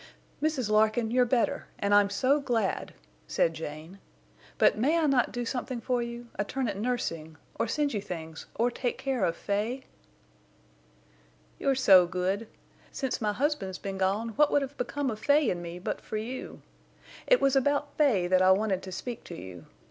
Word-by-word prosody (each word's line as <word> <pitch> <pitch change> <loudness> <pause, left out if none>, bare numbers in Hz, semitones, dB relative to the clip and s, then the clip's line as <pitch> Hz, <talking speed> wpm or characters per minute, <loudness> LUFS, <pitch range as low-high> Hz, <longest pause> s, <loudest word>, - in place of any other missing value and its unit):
"Mrs. 300 -6 0
Larkin, 220 +1 +3
you're 250 0 +4
better, 235 -1 0
and 200 0 0
I'm 205 -1 +5
so 260 +8 +2
glad," 235 -8 -1 0.3
said 165 - +1
Jane. 160 +4 -8 0.6
"But - - +5
may 280 +10 +2
I 325 - +2
not 270 -4 +2
do 245 0 -3
something 250 0 -3
for 245 +1 0
you—a 235 -3 -5
turn 260 +4 -2
at 205 - -2
nursing, 165 -9 -3 0.2
or - - +1
send 295 -3 0
you 205 - -1
things, 160 -4 -7
or 240 +2 +1
take 245 0 -2
care 265 -6 -1
of 165 - +1
Fay?" 220 +6 -2 1.8
"You're 275 -1 +2
so 190 -9 +6
good. 190 +5 -2 0.4
Since 265 -4 -3
my 210 -1 +1
husband's 215 -7 -1
been 195 -1 -5
gone 200 +5 0
what 290 +7 +3
would 285 - +3
have 275 +1 -7
become 270 +1 -2
of 215 - -6
Fay 290 0 +3
and 175 - -3
me 170 0 -7
but 180 - -4
for 215 - -5
you? 240 +5 -6 0.6
It - - +5
was 275 0 +3
about 285 +2 +1
Fay 250 - +3
that 185 +1 +3
I 185 - +5
wanted 190 -1 +2
to 185 - -8
speak 235 +5 -6
to - - -8
you. 90 -3 -10
230 Hz, 180 wpm, -28 LUFS, 190-265 Hz, 1.8 s, so